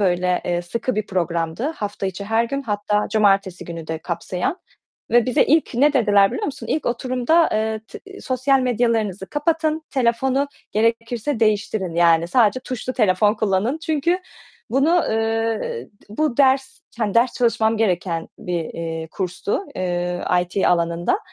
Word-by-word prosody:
Böyle, 180 Hz, -2 st, +1 dB
eee, 175 Hz, 0 st, -1 dB
sıkı 235 Hz, +7 st, -3 dB
bir 215 Hz, -1 st, -2 dB
programdı. 170 Hz, -, -1 dB
Hafta 205 Hz, -1 st, -4 dB
içi 190 Hz, +2 st, -5 dB
her 225 Hz, +2 st, +1 dB
gün 275 Hz, +4 st, -3 dB
hatta 210 Hz, -2 st, -1 dB
cumartesi 195 Hz, -3 st, +2 dB
günü 165 Hz, -2 st, -7 dB
de 160 Hz, 0 st, -3 dB
kapsayan 180 Hz, -, -3 dB, 0.5 s
ve 240 Hz, 0 st, +4 dB
bize 250 Hz, -, +3 dB
ilk 310 Hz, -4 st, +2 dB
ne 285 Hz, +4 st, +4 dB
dediler 205 Hz, -6 st, +4 dB
biliyor 250 Hz, -, -3 dB
musun? 265 Hz, -5 st, -6 dB
İlk 275 Hz, +6 st, -1 dB
oturumda, 255 Hz, +7 st, +2 dB
eee, 220 Hz, 0 st, -1 dB
t 395 Hz, 0 st, -11 dB
"Sosyal 260 Hz, +1 st, +1 dB
medyalarınızı 230 Hz, -6 st, 0 dB
kapatın, 315 Hz, +1 st, 0 dB
telefonu 265 Hz, +2 st, +1 dB, 0.2 s
gerekirse 230 Hz, +3 st, 0 dB
değiştirin, 210 Hz, -4 st, 0 dB
yani 170 Hz, -1 st, +4 dB
sadece 240 Hz, +3 st, +3 dB
tuşlu 255 Hz, 0 st, -5 dB
telefon 210 Hz, -2 st, +3 dB
kullanın." 215 Hz, +6 st, 0 dB
Çünkü 330 Hz, +3 st, +1 dB, 0.5 s
bunu, 315 Hz, +7 st, +3 dB
eee, 225 Hz, -, -1 dB, 0.2 s
bu 245 Hz, +4 st, -1 dB
ders, 265 Hz, -1 st, +2 dB, 0.2 s
hani, 210 Hz, -3 st, -1 dB
ders 235 Hz, +2 st, +4 dB
çalışmam 225 Hz, -2 st, +2 dB
gereken 175 Hz, -5 st, -1 dB
bir, 175 Hz, -2 st, -3 dB
eee, 165 Hz, 0 st, -5 dB
kurstu. 185 Hz, -, -2 dB
Eee, 175 Hz, -1 st, -2 dB, 0.2 s
IT 180 Hz, +2 st, -1 dB
alanında, 170 Hz, -, +1 dB
220 Hz, 145 wpm, -21 LUFS, 185-255 Hz, 0.5 s, ve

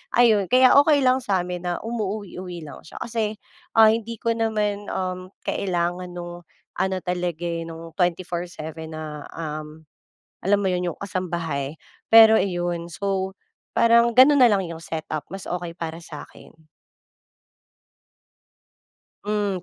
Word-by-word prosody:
ayun 220 Hz, -6 st, +4 dB
kaya 255 Hz, 0 st, +6 dB
okey 285 Hz, -3 st, +3 dB
lang 255 Hz, +1 st, +3 dB
samin 180 Hz, -5 st, -1 dB
na 175 Hz, -, -1 dB
umuuwi-uwi 195 Hz, -6 st, -5 dB
lang 145 Hz, -, -10 dB
siya -, -, -13 dB
kasi, 220 Hz, -2 st, -2 dB, 0.4 s
ah, 220 Hz, -1 st, +9 dB
hindi 230 Hz, 0 st, -4 dB
ko 230 Hz, +1 st, 0 dB
naman 210 Hz, -2 st, -1 dB
um 185 Hz, 0 st, -3 dB, 0.2 s
kailangan 180 Hz, -1 st, -1 dB
nung 175 Hz, 0 st, -7 dB, 0.4 s
ano 190 Hz, 0 st, 0 dB
talaga 175 Hz, -2 st, -2 dB
eh 170 Hz, -1 st, -2 dB
nung 165 Hz, 0 st, -9 dB
24/7 170 Hz, -3 st, -3 dB
na, 155 Hz, -2 st, -7 dB
um, 155 Hz, 0 st, -7 dB, 0.6 s
alam 200 Hz, +2 st, +3 dB
mo 195 Hz, -, +1 dB
yun 180 Hz, 0 st, -1 dB
yung -, -, -18 dB
kasambahay, 170 Hz, -7 st, -3 dB, 0.4 s
pero 220 Hz, -1 st, +9 dB
iyon 175 Hz, -2 st, -2 dB
so 190 Hz, +2 st, -2 dB, 0.4 s
parang 235 Hz, 0 st, +4 dB
ganun 275 Hz, +2 st, +7 dB
nalang 205 Hz, -6 st, +5 dB
yung 165 Hz, -1 st, -7 dB
set-up 155 Hz, -2 st, -5 dB
mas 195 Hz, +2 st, -7 dB
okey 175 Hz, -1 st, -4 dB
para 165 Hz, 0 st, -5 dB
sakin. 160 Hz, 0 st, -12 dB, 2.6 s
Mm, 205 Hz, -3 st, -1 dB
180 Hz, 130 wpm, -23 LUFS, 170-210 Hz, 2.6 s, ah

